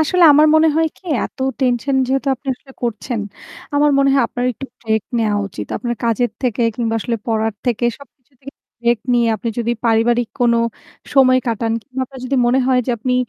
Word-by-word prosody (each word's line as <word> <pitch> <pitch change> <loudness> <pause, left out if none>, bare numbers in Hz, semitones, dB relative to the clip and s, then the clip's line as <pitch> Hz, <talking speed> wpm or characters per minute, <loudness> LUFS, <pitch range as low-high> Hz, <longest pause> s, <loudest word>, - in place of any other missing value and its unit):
আসলে 355 +4 +2
আমার 300 +2 +6
মনে 315 0 +5
হয় 325 0 +3
কি - - -26 0.2
এত - - -9 0.2
টেনশন 260 +1 +1
যেহেতু 270 +2 0
আপনি 275 +2 -22
আসলে 265 +2 -18
করছেন 235 0 -2 0.5
আমার 295 +1 +4
মনে 275 0 +4
হয় 270 - +4
আপনার 245 - -3
একটু 270 +4 -8
ব্রেক 220 -2 0 0.2
নেয়া 215 -2 +1
উচিত, - - -7
আপনার 240 -1 -3
কাজের 235 +1 +1
থেকে 240 -1 0
কিংবা 225 -1 -1
আসলে 235 +1 -2
পড়ার 220 -1 0
থেকে 240 -1 0
সবকিছু 260 -1 -19
থেকে 275 +1 -11 0.3
ব্রেক 235 -1 +2
নিয়ে 235 -1 +3
আপনি 230 - -4
যদি 235 0 0
পারিবারিক 230 +1 +2
কোনো 235 -1 +3 0.6
সময় 255 -2 +6
কাটান 225 0 -1
কিংবা 260 +1 -7
আপনার 265 0 -12
যদি 265 +2 -1
মনে 245 +2 +3
হয় 260 -1 +3
যে - - 0
আপনি 250 +3 -1
245 Hz, 195 wpm, -18 LUFS, 230-270 Hz, 0.6 s, আমার